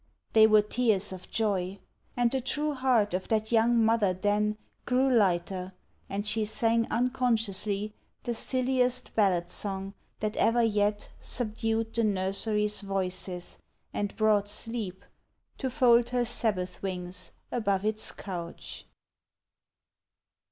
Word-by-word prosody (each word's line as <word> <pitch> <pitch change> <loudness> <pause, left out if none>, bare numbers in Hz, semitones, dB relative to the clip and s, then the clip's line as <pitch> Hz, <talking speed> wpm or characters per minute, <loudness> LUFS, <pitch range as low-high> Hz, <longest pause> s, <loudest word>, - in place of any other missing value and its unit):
They 220 -1 +8
were 215 -1 +5
tears 210 -3 +1
of 185 -1 -10
joy; 200 -4 -1 0.4
And 240 -1 +3
the 265 - 0
true 295 +4 -1
heart 250 -7 +2
of 185 +1 -2
that 220 0 0
young 230 0 +4
mother 220 -4 +3
then 210 +2 +1 0.3
Grew 255 +2 +3
lighter, 190 -5 +1 0.4
and 200 +1 -3
she 215 +1 +1
sang 230 +1 +1
unconsciously 220 -4 0 0.3
The 240 - -2
silliest 255 +1 0
ballad 185 -5 +2
song 195 -1 -2 0.3
that 215 0 -2
ever 235 +1 +3
yet 210 -1 +1
Subdued 225 -1 -1
the 230 - +1
nursery's 210 +1 +1
voices, 185 -2 -4 0.3
and 205 -1 -3
brought 210 -2 +3
sleep 210 -3 -4 0.5
To 265 - -1
fold 240 -2 +4
her 245 -1 +1
sabbath 205 -6 -2
wings 180 -1 -4 0.2
above 200 -4 0
its 215 0 -2
couch. 175 -4 -7
215 Hz, 125 wpm, -29 LUFS, 195-235 Hz, 0.5 s, They